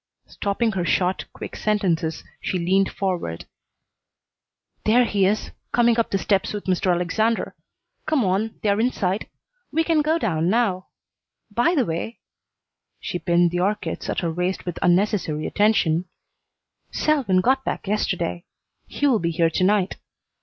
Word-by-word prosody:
Stopping 215 +3 -1
her 190 -4 -2
short, 180 +2 +1
quick - - -8
sentences, 175 -7 0 0.2
she 185 - -2
leaned 190 +3 +2
forward. 180 - -3 1.4
"There 240 +3 +4
he 200 -4 +2
is, 210 +2 -1 0.2
coming 235 -1 +3
up 230 - +1
the 195 - +1
steps 195 +1 0
with 205 - -4
Mr. 185 0 +1
Alexander. 200 +6 0 0.5
Come 305 -7 +2
on; 200 +4 0
they're 205 -1 +2
inside. 210 -5 0 0.4
We 325 +2 +2
can 320 -2 +2
go 310 +2 +2
down 170 - 0
now. 200 -4 +1 0.6
By 240 +11 +2
the 265 -6 +2
way" 170 +7 -4 0.8
she 175 - -4
pinned 175 -1 +2
the 175 - -1
orchids 190 -2 -2
at - - -1
her 170 -2 -1
waist 180 +2 -2
with 175 -2 -4
unnecessary 175 -4 +1
attention 185 -6 +2 0.8
"Selwyn 270 -12 +2
got 265 +6 +2
back - - -3
yesterday. 180 -4 -1 0.4
He - - -2
will 255 -6 +4
be 170 - 0
here 165 0 +1
to 185 - 0
night. 200 0 +2
195 Hz, 145 wpm, -23 LUFS, 175-225 Hz, 1.4 s, There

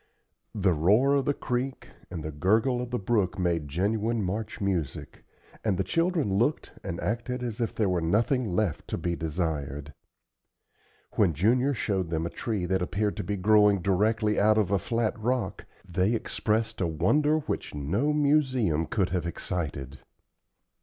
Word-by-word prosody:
The 95 -3 +2
roar 105 - +4
of 140 -2 +2
the 145 - +2
creek 130 +2 -3 0.2
and 85 -4 -6
the 80 - -4
gurgle 110 - +2
of 125 - -5
the 125 - -1
brook 100 -3 0
made 85 -5 0
genuine 105 +8 0
March 105 +4 -3
music, 90 -9 -3 0.4
and 105 -5 +1
the 95 - +1
children 165 - +1
looked 145 +7 0
and 85 - -4
acted 120 +3 -2
as 120 -1 -4
if 115 - -1
there 110 - +1
were 90 -2 +1
nothing 110 +6 +1
left 90 -3 -1
to - - -3
be 85 -1 -2
desired. 75 -4 -3 1.2
When 90 -7 +3
Junior 125 - +2
showed 95 -7 -1
them 80 0 -1
a 85 - -4
tree 105 -6 -2
that 95 +1 0
appeared 100 +3 -1
to - - -2
be 100 +3 -2
growing 105 +1 +5
directly 105 +3 +2
out 110 +1 +4
of 100 -3 +1
a 100 - +3
flat 115 +4 -1
rock, 120 -3 -2 0.2
they 95 +5 +1
expressed 110 -1 -1
a 90 - +2
wonder 145 - +2
which 150 - -4
no 95 - 0
museum 130 - +2
could 95 -5 0
have 90 -2 -1
excited. 75 -6 -4
100 Hz, 165 wpm, -27 LUFS, 85-120 Hz, 1.2 s, growing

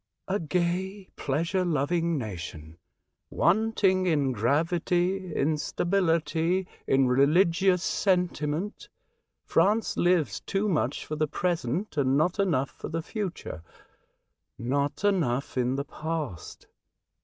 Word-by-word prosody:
" - - -56
A 195 +2 0
gay, 180 +4 -2
pleasure 165 +7 0
loving 165 +1 0
nation, 85 - -7 0.5
wanting 190 -1 +2
in 145 -5 +2
gravity, 175 - 0
in 150 +2 +1
stability, 170 0 +1 0.2
in 135 -1 +4
religious 170 +7 +3
sentiment. 180 -1 -1 0.6
France 215 +3 +2
lives 175 -4 +2
too 200 +2 -1
much 175 -7 0
for 155 - -4
the 155 0 0
present 170 - -2
and 135 -1 +3
not 175 +6 +1
enough 145 -9 +1
for - - -8
the 165 0 -3
future 185 - -5 0.6
— - - -53
not 140 - -1
enough 155 -11 +1
in 125 0 +1
the 140 +1 -2
past. 155 - -5
165 Hz, 115 wpm, -27 LUFS, 140-185 Hz, 0.6 s, in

